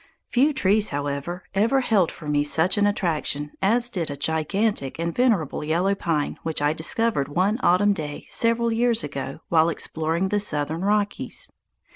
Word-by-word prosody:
Few 275 +5 +3
trees, 210 -5 +2
however, 145 +5 -4
ever 230 +7 +2
held 205 -9 +2
for 155 - -11
me 145 0 +2
such 160 +4 +3
an 205 -1 +3
attraction 155 -7 -1
as 230 +5 +3
did 175 -7 -2
a 140 - -5
gigantic 160 +1 -1
and 170 +1 -2
venerable 215 - +1
yellow 170 +6 +1
pine 165 -6 -2
which 160 -1 -2
I 145 +1 +1
discovered 160 0 0
one 185 - 0
autumn 205 +2 +4
day 150 -5 -6
several 230 0 +1
years 230 -2 +2
ago 140 0 -6
while 165 0 +4
exploring 165 +3 -2
the 205 +1 +1
southern 155 -4 -1
Rockies. 205 +1 -1
175 Hz, 160 wpm, -24 LUFS, 150-210 Hz, -, autumn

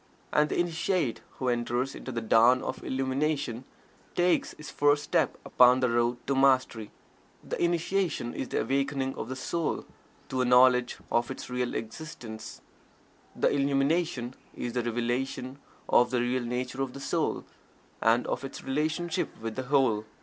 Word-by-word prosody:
And 150 0 +3
the - - -1
Initiate 175 - 0
who 130 - -4
enters 120 +2 0
into 130 - -7
the 115 -1 -3
dawn 115 +3 +5
of - - -5
Illumination 135 -1 -1 0.5
takes 175 0 +2
his 150 - -9
first 145 0 +3
step - - +1
upon 125 +1 +6
the 125 -2 +1
road 120 +1 +1
to 140 - 0
Mastery. 130 -5 +2 0.5
The - - -3
Initiation 170 -6 0
is 130 - -4
the - - -1
awakening 135 -1 0
of - - -6
the 130 - -3
soul 160 +4 -2 0.4
to 130 - 0
a - - +2
knowledge 125 0 +5
of 120 0 +1
its - - -7
real 125 0 -1
existence 115 -2 -7 0.7
the - - +2
Illumination 140 -2 +1 0.2
is 120 - -4
the 125 - 0
revelation 120 +3 -2 0.3
of 120 0 +4
the 125 - 0
real 125 +1 0
nature 125 +2 -3
of 135 -2 -2
the 140 - -8
soul, - - -1 0.6
and 115 +2 +3
of - - -3
its 135 - -7
relationship 160 +5 -1
with 110 0 -5
the 130 - -4
Whole. 125 -7 +3
130 Hz, 155 wpm, -28 LUFS, 120-145 Hz, 0.7 s, upon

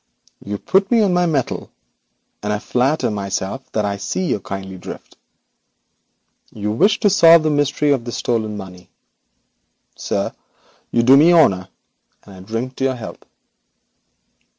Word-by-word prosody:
You 100 0 -4
put 195 - +1
me 230 -2 +4
on 195 -3 +2
my 180 0 +2
mettle, 145 -6 -2 0.7
and 105 - -3
I 105 - 0
flatter 125 +6 0
myself 100 +4 -4
that 105 -1 0
I 100 0 -2
see 185 - -3
your 130 - -1
kindly 95 -1 -7
drift. - - -10 1.4
You 105 -1 -4
wish 195 - +3
me - - -34
to 210 - +4
solve 165 -4 +7
the 155 - +1
mystery 145 0 +1
of 135 -4 +1
this 120 0 -5
stolen 110 -3 -2
money. 90 -2 -11 1.1
Sir, - - -3 0.6
you 115 - +1
do 130 +3 +7
me 155 +5 +6
honour, 95 - +3 0.5
and 100 - -15
I 95 - -13
drink 115 +7 -5
to - - -3
your 135 -1 +1
health.' 115 -3 -9
120 Hz, 155 wpm, -19 LUFS, 100-155 Hz, 1.4 s, solve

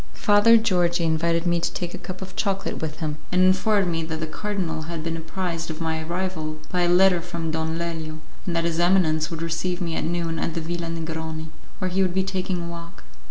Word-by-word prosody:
Father 210 +3 +6
Georgi 180 -5 +2
invited 165 +1 +1
me 175 -1 +3
to 170 - 0
take 175 -1 -4
a - - -5
cup 185 +1 -6
of 185 -1 -10
chocolate 195 -1 -1
with 155 0 -4
him, 155 -1 -2
and 185 +1 +4
informed 190 +1 +4
me 165 0 0
that 160 0 -3
the 160 - -1
cardinal 165 -3 -3
had 165 -2 -4
been 165 0 -2
apprised 165 0 -3
of 160 0 -5
my 160 -1 -1
arrival 165 -2 -2
by 180 - +1
a 175 - +3
letter 180 0 +5
from 170 -2 -3
Don 160 0 -1
Lelio, 160 -2 -3 0.3
and 175 - 0
that 165 - +2
his 170 -1 0
eminence 175 -3 +3
would 165 -1 -4
receive 165 +2 -1
me 170 -3 -2
at - - -1
noon 165 -1 -1
at 165 - -2
the - - 0
Villa 170 +1 -3
Negroni, 160 -1 -4 0.3
where 185 -1 -2
he 190 +2 +2
would 185 -1 +1
be 190 - +3
taking 185 -2 -2
a - - -4
walk. 170 0 -8
170 Hz, 225 wpm, -25 LUFS, 160-185 Hz, 0.3 s, Father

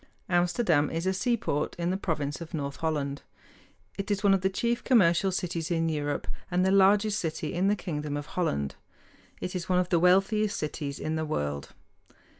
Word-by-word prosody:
Amsterdam 175 -3 +2
is 165 +2 -3
a 190 - +2
seaport 205 - -1
in 175 +1 -1
the - - 0
province 155 -6 -2
of 170 +1 -6
North 140 -2 -4
Holland. 145 -3 -2 0.8
It 195 - -3
is 205 0 0
one 200 -1 +5
of 195 - +2
the 190 - +2
chief 235 +5 -1
commercial 190 -6 +4
cities 175 -2 -2
in 165 -1 +1
Europe 145 -2 -2 0.2
and 180 0 +2
the 190 - +3
largest 200 +2 +4
city 155 -2 -3
in 180 +3 +1
the 205 - +3
kingdom 150 -6 -4
of 145 - -5
Holland. 70 - -1 0.7
It 180 - -4
is 180 0 -4
one 180 - +3
of 180 0 +1
the 170 - +3
wealthiest 195 +4 +3
cities 150 -2 -4
in 155 +1 -2
the 160 - -1
world. 75 - -3
175 Hz, 190 wpm, -28 LUFS, 150-195 Hz, 0.8 s, one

